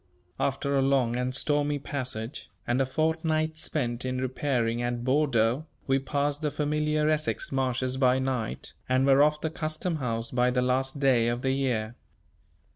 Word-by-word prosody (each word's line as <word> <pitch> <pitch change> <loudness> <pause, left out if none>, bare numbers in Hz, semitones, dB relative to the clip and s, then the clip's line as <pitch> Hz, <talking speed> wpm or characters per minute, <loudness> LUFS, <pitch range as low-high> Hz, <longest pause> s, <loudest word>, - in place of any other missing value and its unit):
After 140 +1 0
a 135 - +3
long 135 -3 +2
and 125 +1 -1
stormy 145 +1 +1
passage, 130 -3 -4 0.2
and 120 +2 +1
a 135 - +1
fortnight 160 +1 0
spent 125 -6 -2
in 130 0 -2
repairing 125 -2 -1
at 120 0 -2
Bordeaux, 130 0 +2 0.2
we 135 0 +2
passed 145 +2 -1
the 150 - 0
familiar 150 +1 0
Essex 155 0 0
marshes 130 -1 0
by 130 -1 +4
night, 130 -4 -3 0.2
and 130 +1 +3
were 140 0 +5
off 150 +1 +3
the 160 - -2
Custom 160 +2 -2
House 115 -4 -3
by 125 0 +2
the 125 0 +1
last 130 +2 0
day 130 -4 +3
of 120 +1 -1
the 130 - +2
year. 120 -5 -1
135 Hz, 165 wpm, -27 LUFS, 125-150 Hz, 0.2 s, were